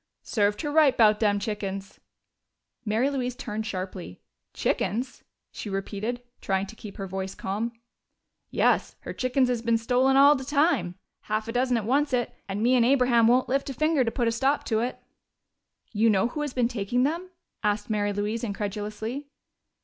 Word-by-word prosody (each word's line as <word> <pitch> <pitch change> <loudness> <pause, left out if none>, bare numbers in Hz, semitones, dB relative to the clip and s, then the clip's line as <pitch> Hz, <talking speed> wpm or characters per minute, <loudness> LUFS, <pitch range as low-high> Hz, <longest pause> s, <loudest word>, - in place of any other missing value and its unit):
Served 205 -1 +1
her 295 - -2
right 300 -3 +4
'bout 215 -2 +5
dem 205 -2 +2
chickens!" 195 -2 -4 0.8
Mary 230 +5 +1
Louise 250 -3 -2
turned 220 -5 -4
sharply. 185 - -6 0.3
"Chickens?" 245 +5 -2 0.3
she 210 - -7
repeated, 210 +5 -3 0.2
trying 195 0 0
to 220 - -11
keep 210 -2 -10
her 195 - -4
voice 190 0 -5
calm. 210 +5 -3 0.8
"Yes. - - +1
Her - - -6
chickens 255 0 +1
is 245 -2 -1
bein' 230 0 +2
stolen 255 +3 +2
all 280 +1 +8
de 265 - -4
time. 285 - +1 0.3
Half 215 +1 -2
a - - -3
dozen 250 +1 +1
to 230 - 0
oncet 260 -2 +1 0.2
and 200 +3 -2
me 245 +2 +4
and 250 -2 +5
Abraham 245 -2 +4
won't 250 +2 +4
lift 275 +2 0
a 270 - -5
finger 310 -1 +2
to 230 - 0
put 240 0 -1
a - - +2
stop 270 +5 +1
to 220 -2 0
it!" 245 +2 -2 0.9
"You 225 +1 +3
know 205 +2 +3
who 300 - -4
has 295 -3 -4
been 245 -2 +2
taking 240 +1 -1
them?" 335 +6 -1 0.3
asked 210 -1 0
Mary 205 -1 +1
Louise 210 +3 -2
incredulously. 215 +5 -4
230 Hz, 175 wpm, -26 LUFS, 205-255 Hz, 0.9 s, all